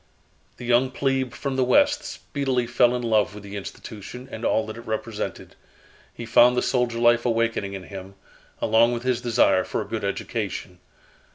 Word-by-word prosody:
The 125 - -8
young 125 +2 +3
plebe 135 -1 -1
from 135 +1 -4
the 130 - +3
West 290 - +3
speedily 135 -4 -2
fell 120 +1 +3
in 125 - -3
love 110 -4 +2
with 105 - -10
the 100 0 -8
institution 105 +5 -8
and 110 - -7
all 110 - +2
that 110 - -7
it 115 - -11
represented. 110 0 -4 0.6
He 120 - -8
found 120 +2 +5
the - - +2
soldier 125 -2 0
life 120 0 +4
awakening 115 -4 0
in 95 -1 -6
him, 95 0 -9 0.5
along 115 +2 +4
with 120 0 -4
his 125 -2 0
desire 115 -6 +3
for - - -3
a - - -3
good - - -4
education. 90 -1 -4
120 Hz, 180 wpm, -24 LUFS, 110-125 Hz, 0.6 s, found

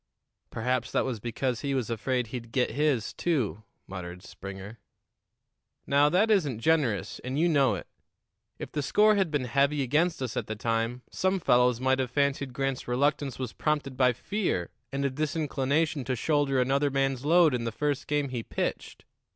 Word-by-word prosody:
"Perhaps 125 +1 -1
that - - +2
was 125 -4 -3
because 120 +2 -2
he 140 -1 -1
was 120 -3 -1
afraid 125 +3 -1
he'd 115 0 -7
get 125 0 +1
his, 140 -6 0
too," 130 - -1 0.2
muttered 90 -1 -8
Springer. 100 +4 -9 1.1
"Now, 145 +1 +4
that 200 +7 +3
isn't 150 - +2
generous, 130 - +1
and 130 +2 -4
you 165 +3 +3
know 140 -9 +3
it. - - -7 0.7
If - - -7
the 150 - -2
score 210 +10 +4
had 195 -4 +1
been 145 -4 -1
heavy 140 +3 +2
against 155 +7 +1
us 125 - -4
at - - -2
the 110 - -3
time, 115 +3 -1
some 190 +1 0
fellows 125 -6 +3
might 130 +1 +2
have 130 -1 0
fancied 140 0 0
Grant's 135 0 -2
reluctance 140 +2 0
was 130 -4 -4
prompted 150 -3 -1
by 125 -1 +4
fear 175 - -2 0.2
and 140 0 -1
a 140 - +1
disinclination 150 0 0
to 130 +1 -1
shoulder 145 +1 +1
another 135 +3 +2
man's 135 -1 0
load 165 0 +5
in 120 -2 -1
the 115 - -1
first 145 +2 -2
game 145 -2 0
he 125 -2 -3
pitched. - - -4
135 Hz, 175 wpm, -28 LUFS, 120-150 Hz, 1.1 s, load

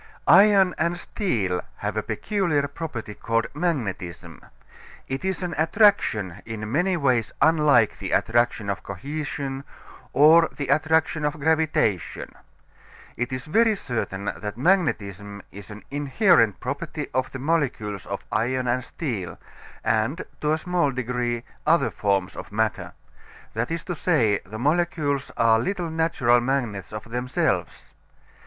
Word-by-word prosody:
Iron 195 -1 +6
and 170 +2 +1
steel 100 - -1 0.2
have - - -3
a - - 0
peculiar 170 -9 0
property 140 -8 -6
called 115 +2 -1
magnetism. 100 - -3 0.6
It 135 +1 -4
is 190 -1 -2
an 175 -2 -3
attraction 160 - +2
in 110 -1 -6
many 180 +6 +1
ways 130 -7 +1
unlike 150 -8 +4
the - - -4
attraction 120 -2 +1
of 100 - -5
cohesion 140 +4 -5 0.5
or 160 +3 +6
the 140 -3 -4
attraction 160 0 +2
of 150 +1 -1
gravitation. 155 - 0 0.8
It 120 +3 -3
is 130 -1 -4
very 220 +7 +3
certain 110 - -4
that 105 +1 -6
magnetism 105 - 0
is 100 -1 -11
an 105 0 -10
inherent 140 - +3
property 145 +3 -4
of 130 0 -1
the - - -5
molecules 130 - -1
of - - -5
iron 125 +3 0
and 125 +1 0
steel, 115 - -5 0.5
and, 115 +9 0 0.2
to 150 0 +2
a - - +1
small 175 -2 0
degree, 125 -2 -2 0.2
other 160 -3 +3
forms 100 -2 0
of - - -8
matter. 105 -5 -1 0.6
That 115 +2 -2
is 165 -1 -3
to 180 - -4
say, 125 - +2
the 110 +3 -7
molecules 145 0 0
are 115 -1 +4
little 175 - -2
natural 160 -7 +2
magnets 120 -7 -2
of 105 - -6
themselves. 125 +1 -2
135 Hz, 135 wpm, -24 LUFS, 110-160 Hz, 0.8 s, Iron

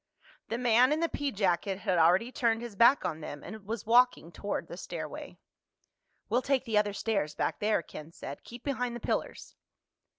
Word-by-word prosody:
The 230 - -2
man 245 +2 +4
in 305 - +2
the 335 - +2
pea 285 -3 -2
jacket 195 -2 0
had 185 -5 +1
already 180 +9 +4
turned 230 -2 +1
his 235 -4 -7
back 235 +6 +5
on 160 0 -3
them 145 -1 -7
and 215 -2 -9
was 225 -1 -4
walking 240 -7 +4
toward 200 +5 -4
the - - -8
stairway. - - -7 0.9
"We'll 245 - +2
take 270 -1 0
the 220 -3 +3
other 205 -1 0
stairs 200 -8 -1
back - - -1
there," 210 -4 +1
Ken 155 +1 -10
said. 140 -4 -8
"Keep 240 +1 -11
behind 250 -4 -2
the - - -5
pillars." - - -3
225 Hz, 190 wpm, -30 LUFS, 190-245 Hz, 0.9 s, back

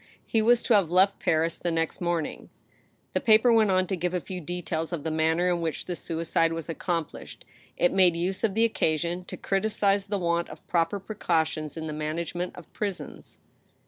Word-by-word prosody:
He 225 - +1
was 240 +2 +4
to 240 - +2
have 195 -6 +4
left 190 +3 +3
Paris 160 0 +1
the 175 - -2
next 165 +1 -1
morning 170 -3 -2 0.2
— - - -36
" - - -41
The - - 0
paper 225 +2 +5
went 220 -2 +4
on 185 -1 +3
to 190 - -2
give 180 +1 -2
a - - +1
few 180 +1 -7
details 165 -1 -3
of 165 -5 -4
the 160 - -2
manner 160 +3 +2
in 175 -1 +1
which 160 -2 -3
the 180 - -3
suicide 165 0 0
was 165 -2 -5
accomplished. 165 -1 -4 0.3
It 175 - +3
made 185 -3 +5
use 180 +4 -2
of 210 -3 +1
the 225 +1 +4
occasion 175 -3 -1
to - - -7
criticise 200 0 +1
the 205 0 -1
want 170 -2 0
of 155 - -12
proper 170 +3 0
precautions 160 -6 -1
in 160 - -4
the 155 - -4
management 165 +4 -3
of 175 - -13
prisons. 200 -4 -5
175 Hz, 205 wpm, -27 LUFS, 165-195 Hz, 0.3 s, paper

